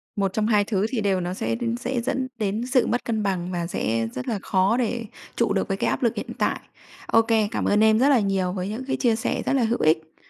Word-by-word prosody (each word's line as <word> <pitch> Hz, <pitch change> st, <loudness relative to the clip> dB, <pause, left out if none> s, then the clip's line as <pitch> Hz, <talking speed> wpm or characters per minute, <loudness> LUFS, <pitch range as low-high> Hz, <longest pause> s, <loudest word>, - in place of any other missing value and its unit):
Một 195 Hz, -2 st, 0 dB
trong 215 Hz, -1 st, 0 dB
hai 210 Hz, -2 st, +3 dB
thứ 200 Hz, -1 st, 0 dB
thì 235 Hz, -3 st, -2 dB
đều 195 Hz, -2 st, +1 dB
nó 175 Hz, +1 st, -3 dB
sẽ 210 Hz, -, -2 dB, 0.2 s
sẽ 250 Hz, 0 st, -2 dB
dẫn 260 Hz, +1 st, -1 dB
đến 215 Hz, +3 st, -1 dB
sự 255 Hz, -1 st, +2 dB
mất 245 Hz, -, 0 dB
cân 220 Hz, -2 st, -1 dB
bằng 185 Hz, -2 st, -2 dB
và 175 Hz, -2 st, -2 dB
sẽ 115 Hz, -8 st, -1 dB
rất 125 Hz, -, -5 dB
là 215 Hz, -, -1 dB
khó 195 Hz, +4 st, +2 dB
để 235 Hz, -1 st, -1 dB, 0.3 s
trụ -, -, +1 dB
được -, -, 0 dB
với -, -, -2 dB
cái -, -, 0 dB
áp -, -, -2 dB
lực -, -, +2 dB
hiện -, -, -5 dB
tại. -, -, 0 dB, 0.5 s
Ô 225 Hz, -, +5 dB
kê, 225 Hz, -2 st, +2 dB
cảm -, -, -2 dB
ơn 210 Hz, +1 st, +3 dB
em 220 Hz, 0 st, +5 dB
rất 275 Hz, +3 st, +4 dB
là 270 Hz, -, +5 dB
nhiều 195 Hz, -3 st, 0 dB
với 185 Hz, 0 st, -3 dB
những 225 Hz, +5 st, -4 dB
cái -, -, -1 dB
chia 230 Hz, -3 st, +2 dB
sẻ 225 Hz, -, -2 dB
rất -, -, +1 dB
là 265 Hz, -, +2 dB
hữu 230 Hz, +2 st, 0 dB
ích. 160 Hz, 0 st, +1 dB
215 Hz, 270 wpm, -24 LUFS, 190-235 Hz, 0.5 s, Ô